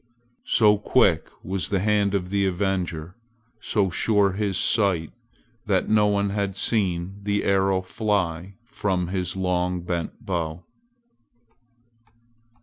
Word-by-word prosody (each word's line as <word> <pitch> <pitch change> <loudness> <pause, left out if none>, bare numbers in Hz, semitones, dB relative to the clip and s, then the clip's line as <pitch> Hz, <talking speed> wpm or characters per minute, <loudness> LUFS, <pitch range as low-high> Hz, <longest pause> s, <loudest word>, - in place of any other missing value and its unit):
So 105 -2 +4
quick 100 -7 +2
was 95 0 -2
the 100 - +1
hand 100 0 +1
of 90 -1 -3
the 100 -1 +1
avenger, 90 -3 -2 0.4
so 100 -3 0
sure 100 +2 +2
his 100 -1 -1
sight, 95 -7 +1 0.6
that 95 -3 +1
no 105 -1 +4
one 100 -1 +1
had 100 -2 -2
seen 95 -3 0
the 100 0 -1
arrow 95 -1 +2
fly 95 -3 -2
from 95 -6 -2
his 90 -2 -2
long 90 -1 -1
bent 85 -1 -4
bow. 85 -2 -3
95 Hz, 120 wpm, -24 LUFS, 90-100 Hz, 0.6 s, So